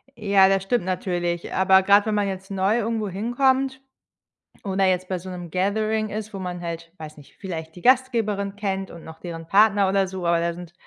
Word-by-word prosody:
Ja, 200 -3 +4
das 195 -1 +1
stimmt 195 -1 0
natürlich. 175 -2 -2
Aber 190 0 +4
grade 200 +1 +5
wenn 215 - 0
man 205 -1 +1
jetzt 195 0 -6
neu 195 +3 +1
irgendwo 220 -2 -2
hinkommt 260 +6 0 0.8
oder 195 -1 0
jetzt 185 -1 +1
bei 185 - -2
so 185 +2 -9
'nem 175 -2 -7
Gathering 215 +3 0
ist, 215 +1 -6
wo 195 - -5
man 180 -1 -5
halt 165 -1 -6
weiß 155 -1 -10
nicht, 145 - -17
vielleicht 160 -4 -7
die 180 - -11
Gastgeberin 225 -6 +1
kennt 195 -2 -3
und 170 - -11
noch 160 0 -11
deren 165 -2 -8
Partner 200 0 +4
oder 195 0 +2
so, 185 -1 -6
aber 170 0 +3
da 170 0 -1
sind 175 0 -10
190 Hz, 205 wpm, -23 LUFS, 175-210 Hz, 0.8 s, grade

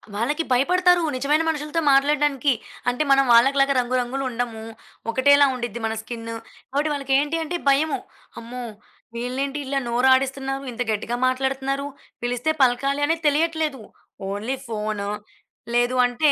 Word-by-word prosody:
వాళ్ళకి 295 +10 -1
భయపడతారు 355 +7 +3
నిజమైన 295 +5 +1
మనుషులతో 300 +1 -2
మాట్లాడడానికి. 285 0 +2 0.4
అంటే 245 +5 0
మనం 275 0 +5
వాళ్ళకి 265 +4 +5
లాగా 275 0 +3
రంగు 250 +1 -1
రంగులు 260 +3 -3
ఉండము. 230 -2 -4 0.5
ఒకటేలా 285 +3 +5
ఉండిద్ది 240 -2 -5
మన 220 - -1
స్కిన్ 230 0 -7 0.4
కాబట్టి 290 +3 0
వాళ్ళకి 275 -1 -2
ఏంటి 295 +3 -1
అంటే, 350 +3 -3
భయము. 285 +3 +2 0.4
అమ్మో! 245 +2 -7 0.5
వీళ్ళేంటి 265 +4 -3
ఇలా 275 +1 -1
నోరు 245 +2 +2
ఆడిస్తున్నారు 270 +1 -1
ఇంత 240 +1 -6
గట్టిగా 220 +3 -2
మాట్లాడుతున్నారు. 270 +1 -1 0.4
పిలిస్తే 245 +5 0
పలకాలి 275 +3 +2
అనేది 325 +2 -1
తెలియట్లేదు. 310 -3 0 0.5
Only 215 +7 -3
phone. 210 -2 -3 0.7
లేదు 245 +1 +2
అంటే, 280 +5 +2
270 Hz, 135 wpm, -23 LUFS, 245-290 Hz, 0.7 s, మనం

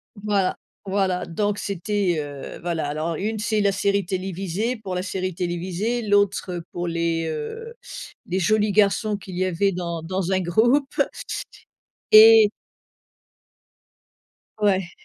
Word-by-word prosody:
Voilà 200 -2 0 0.3
voilà 190 -2 0
donc 205 +4 -1
c'était, 200 -2 -1
heu 145 -2 -7
voilà, 165 -4 -2
alors 155 +3 -2
une 215 +6 -2
c'est 215 0 0
la 200 - +3
série 200 0 +1
télévisée, 190 +4 -3
pour 195 -4 -6
la 180 - -2
série 185 -2 -3
télévisée, 185 +7 -2
l'autre, 205 -3 +1
heu, 175 -1 -5
pour 175 0 -3
les, 165 -1 -1
heu, 160 - -5 0.5
les 185 +2 -1
jolis 210 +2 +2
garçons 210 +1 +2
qu'il 190 -3 -8
y 185 - +1
avait 185 +2 +1
dans 170 -2 -4
dans 185 +2 -2
un 190 - +2
groupe. 240 +11 +2 1.2
Et 220 -1 +9 2.1
Ouais. 190 -4 +1
190 Hz, 130 wpm, -23 LUFS, 175-210 Hz, 2.1 s, Et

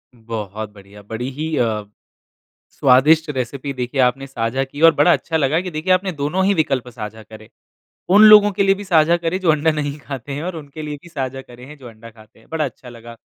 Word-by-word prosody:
बहुत 110 -2 -6
बढ़िया। 100 +1 -15
बड़ी 115 +5 -5
ही 155 +3 -4
अ, 110 -3 0 0.9
स्वादिष्ट 150 +5 +4
रेसिपी 135 +1 -4
देखिए 125 +2 -2
आपने 130 +2 +1
साझा 130 +1 -2
की 145 +3 -11
और 165 0 +8
बड़ा 160 +4 +4
अच्छा 160 - -1
लगा 155 +3 +1
कि 180 -1 -6
देखिए 155 +4 -1
आपने 185 0 +1
दोनों 155 +6 -1
ही 200 +1 +2
विकल्प 135 -6 -1
साझा 110 -2 -8
करे। 110 +1 -14 0.6
उन 210 +2 +7
लोगों 210 -1 +8
के 200 +1 0
लिए 195 0 +3
भी 205 - -8
साझा 170 -2 +3
करे 170 +2 -2
जो 170 -4 +3
अंडा 155 +1 +2
नहीं 145 -1 -3
खाते 140 -1 -8
हैं 145 +3 -5
और 180 -1 -4
उनके 150 0 -9
लिए 150 -1 -5
भी 175 - -15
साझा 135 -4 -5
करे 125 0 -14
हैं 150 +1 -12
जो 130 -3 -12
अंडा 115 +1 -14
खाते 110 0 -20
हैं, - - -24
बड़ा 160 -2 -1
अच्छा 125 -1 -10
लगा 115 0 -12
140 Hz, 220 wpm, -19 LUFS, 120-160 Hz, 0.9 s, और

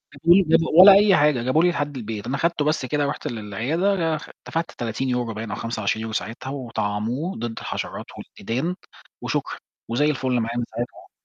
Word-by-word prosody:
هاته 165 - -5
لي 195 +2 +5
بجد 165 -1 +4 0.2
ولا 195 +2 +11
أي 200 0 +6
حاجة 145 -5 +3
جابه 140 +7 +2
لي 180 - +5
لحد 145 -4 -2
البيت، 110 -3 -5
أنا 135 - -1
خدته 165 -1 0
بس 155 -3 0
كده 145 +3 0
رُحت 140 - -3
للعيادة 120 - -1
لآخ 165 -3 -2 0.2
دفعت 165 +1 -2
30€ 120 0 -2
باين 110 +1 -6
أو - - -2
25€ 110 -1 -2
ساعتها 115 +6 -4
وطعَّموه 120 - -3
ضد 115 0 -4
الحشرات - - -5
والديدان 130 - -4 0.5
وشكرًا، - - -2 0.3
وزي 125 +6 +1
الفُل 130 -4 0
معايا 115 +1 -2
من 120 - 0
ساعتها 120 +2 -3
يعني. - - -18
130 Hz, 180 wpm, -23 LUFS, 115-160 Hz, 0.5 s, ولا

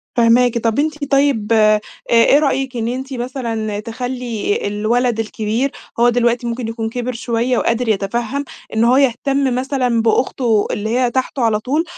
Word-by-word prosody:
فاهماكِ، 240 0 +4
طب 230 +2 0
أنتِ 300 -1 -2
طيب 275 -6 +2
آآ، 215 -1 +5
أ - - 0 0.3
إيه 235 +5 +5
رأيكِ 270 -3 -1
إن 230 0 -2
أنتِ 265 +2 -4
مثلًا 230 -4 -3
تخلّي 235 -1 -3
الولد 225 +3 0
الكبير 225 +4 -1 0.3
هو 240 +1 +5
دلوقتي 240 0 +1
ممكن 235 0 -3
يكون 225 0 -3
كِبِر 245 +2 -3
شوية 235 +1 -1
وقادر 235 0 0
يتفهم، 235 +7 -1 0.3
إن 220 - +2
هو 250 +3 +4
يهتم 270 0 +1
مثلًا 255 -3 0
بأخته 225 -1 +1
اللي 215 +1 -3
هي 245 +1 +1
تحته 260 +1 -2
على 220 -2 +2
طول، 290 +8 0
240 Hz, 160 wpm, -18 LUFS, 225-260 Hz, 0.3 s, آآ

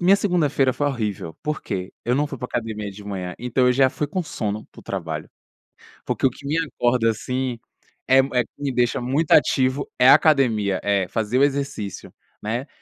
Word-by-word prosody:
Minha 185 +3 +5
segunda-feira 150 -9 +2
foi 145 - -1
horrível. 105 - -3
Por 150 0 -3
quê? 95 -3 -4
Eu 125 - +1
não 145 +2 +1
fui 140 - -7
pra 125 - -5
academia 110 -4 -4
de 100 +1 -12
manhã, 95 -3 -5
então 125 +1 +1
eu 125 - +5
já 130 +1 +4
fui 150 +2 -3
com 185 +3 -2
sono 110 -8 -4
para - - -13
o - - -18
trabalho. 80 -5 -5 0.8
Porque - - -1
o - - +1
que 140 - -14
me 150 +3 -1
acorda, 120 -6 +1
assim, 125 +2 -2 0.5
eh 130 0 +6
eh, 130 -2 +2
que 130 - -22
me 140 -2 -1
deixa 120 0 +1
muito 140 +6 -1
ativo, 130 +1 +3
é 125 - +5
a - - +10
academia, 115 - +3
é, 100 -2 +1
fazer 110 +5 -1
o 140 - +5
exercício, 135 -9 -2 0.3
né. 120 +6 -2
125 Hz, 200 wpm, -23 LUFS, 105-140 Hz, 0.8 s, a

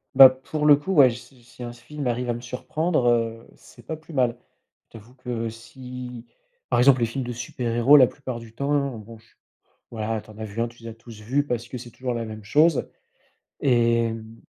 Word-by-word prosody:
Bah, 135 -1 +11
pour 140 +4 -3
le 145 - +9
coup, 145 +7 -5
ouais, 140 -7 +7
j 115 - -5
si 125 +1 -17
si 125 +1 -12
un 120 - -5
s 120 - -15
film 150 +3 -7
arrive 125 0 -1
à - - +2
me 120 - -6
surprendre, 130 +4 -1
heu, 115 -1 0
c'est 120 - -18
pas 160 +8 -5
plus 160 +1 -14
mal. 125 -3 +1 0.5
Je 115 - -10
t'avoue 120 +5 -19
que 120 -3 -4
si, 125 +1 -9 0.4
par - - +2
exemple, 130 +1 +6
les 115 - +1
films 130 +3 -4
de 120 - -4
super 120 0 -4
héros, 130 +5 +7
la 130 - +8
plupart 130 -2 -6
du 115 -1 -13
temps, 140 +4 -1
heu, 140 -4 -1
bon, 115 +2 -12
je 110 - -23
suis - - -29 0.6
voilà, 110 -1 -3
tu - - -21
en 105 - -15
as 110 - -4
vu 105 +2 -7
un, 120 - +1
tu 120 0 -16
les 115 - -6
as - - -8
tous 115 -2 -13
vus, 135 +7 0
parce 120 -1 -3
que 125 - -6
c'est 120 0 -11
toujours 125 +1 -4
la 115 -1 -3
même 110 -1 -8
chose 150 +8 +3 0.7
et 115 -2 +3
hem. 115 0 -7
120 Hz, 245 wpm, -24 LUFS, 115-130 Hz, 0.7 s, Bah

